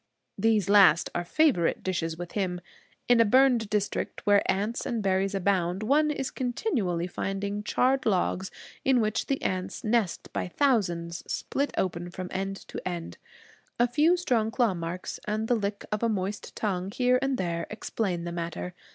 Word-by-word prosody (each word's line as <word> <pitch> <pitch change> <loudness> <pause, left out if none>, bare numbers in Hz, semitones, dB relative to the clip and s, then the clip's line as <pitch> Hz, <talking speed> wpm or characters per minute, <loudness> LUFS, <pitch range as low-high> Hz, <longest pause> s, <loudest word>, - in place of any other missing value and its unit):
These 215 -2 +2
last 195 -5 +6
are 175 - -1
favorite 240 - +2
dishes 165 -3 -2
with 175 0 -7
him. 185 -3 -1 0.5
In 245 -1 +5
a - - +8
burned 245 -1 +4
district, 210 -1 -2
where 205 0 +5
ants 205 +5 -2
and 230 -3 -2
berries 195 +1 +1
abound, 190 0 0
one 300 +6 +3
is 270 -3 -2
continually 240 - -1
finding 195 +3 -3
charred 260 +5 +1
logs, 190 -1 +1 0.3
in 260 -2 +4
which 215 -1 0
the 275 - 0
ants 185 0 -2
nest 220 -4 0
by - - -2
thousands, 175 -9 0
split 280 +1 -1
open 175 -1 -1
from 180 +1 -6
end 195 +1 -2
to - - -5
end. 175 -2 -5 0.6
A 240 - +4
few 305 +8 +3
strong 240 -10 +1
claw 235 -3 +2
marks, 170 +1 -5
and 215 +1 -1
the 245 - +3
lick 205 -3 -2
of 210 - -1
a 230 - +2
moist 200 -1 -3
tongue 190 -3 -2
here 250 +4 +2
and 270 -1 0
there, 170 -3 -2
explain 195 -5 -3
the 170 - -4
matter. 170 +1 -4
200 Hz, 170 wpm, -27 LUFS, 180-235 Hz, 0.6 s, a